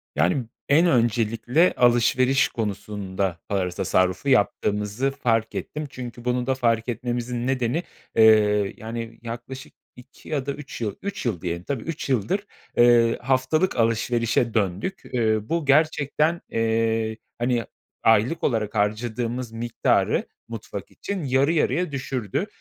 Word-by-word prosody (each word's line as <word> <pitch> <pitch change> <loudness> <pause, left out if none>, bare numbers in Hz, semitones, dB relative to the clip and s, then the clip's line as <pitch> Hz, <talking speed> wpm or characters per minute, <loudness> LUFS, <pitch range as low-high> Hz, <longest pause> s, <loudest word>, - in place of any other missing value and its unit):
Yani, 90 - +1 0.2
en 155 +5 +5
öncelikle 120 +4 +2
alışveriş 125 +2 +4
konusunda 100 -4 -3
para 95 -3 0
tasarrufu 95 +6 0
yaptığımızı 105 +1 +1
fark 115 -4 0
ettim. 150 0 -4
Çünkü 120 -2 -8
bunu 125 0 0
da 135 - +2
fark 115 -2 +1
etmemizin 120 +1 -3
nedeni, 130 +4 0 0.3
eee, 105 -2 +5
yani, 115 +1 -6
yaklaşık 120 +3 -8 0.2
2 125 +2 -15
ya 140 -4 -1
da 140 - -1
üç 145 -3 -9
yıl, 105 -4 -2
üç 200 -7 -5
yıl 105 -9 -1
diyelim, 85 -1 -3
tabii 130 +1 -3
üç 160 -3 -5
yıldır, 170 - 0 0.3
eee, 120 -1 +5
haftalık 135 +8 +1
alışverişe 115 0 +1
döndük. 105 - -1
Uuu, 110 -3 +1
bu 165 -2 0
gerçekten, 155 +2 +2
eee, 115 -1 0 0.2
hani, 120 -1 0 0.4
aylık 115 +8 +3
olarak 110 -3 0
harcadığımız 115 +3 -1
miktarı 115 +1 0 0.2
mutfak - - -7
için 200 -4 -5
yarı 135 +4 +2
yarıya 170 +1 +1
düşürdü. 130 -6 -3
120 Hz, 125 wpm, -24 LUFS, 110-135 Hz, 0.4 s, en